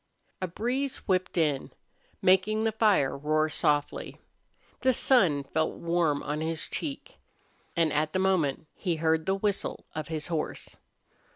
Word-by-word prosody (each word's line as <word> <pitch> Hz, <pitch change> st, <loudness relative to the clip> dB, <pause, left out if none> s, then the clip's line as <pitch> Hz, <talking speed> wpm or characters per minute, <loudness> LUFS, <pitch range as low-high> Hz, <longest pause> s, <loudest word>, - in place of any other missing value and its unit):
A 185 Hz, -, 0 dB
breeze 250 Hz, +9 st, -2 dB
whipped 185 Hz, -2 st, 0 dB
in, 150 Hz, -5 st, +1 dB, 0.5 s
making 195 Hz, +4 st, +4 dB
the 225 Hz, -, +2 dB
fire 210 Hz, -11 st, +3 dB
roar 155 Hz, +2 st, +1 dB
softly. 145 Hz, -2 st, 0 dB, 0.6 s
The 260 Hz, 0 st, +3 dB
sun 185 Hz, -, +3 dB
felt 160 Hz, +3 st, -1 dB
warm 170 Hz, -4 st, 0 dB
on 150 Hz, +1 st, -2 dB
his 160 Hz, 0 st, -1 dB
cheek. 315 Hz, -, -6 dB, 0.6 s
And 165 Hz, -3 st, +2 dB
at 150 Hz, +1 st, +1 dB
the 185 Hz, -, -1 dB
moment 175 Hz, -6 st, +1 dB
he 175 Hz, -4 st, -2 dB
heard 160 Hz, +1 st, +1 dB
the 190 Hz, -, +2 dB
whistle 200 Hz, 0 st, -2 dB
of 155 Hz, -1 st, -4 dB
his 155 Hz, -2 st, -3 dB
horse. 165 Hz, -3 st, -3 dB
165 Hz, 145 wpm, -28 LUFS, 155-195 Hz, 0.6 s, making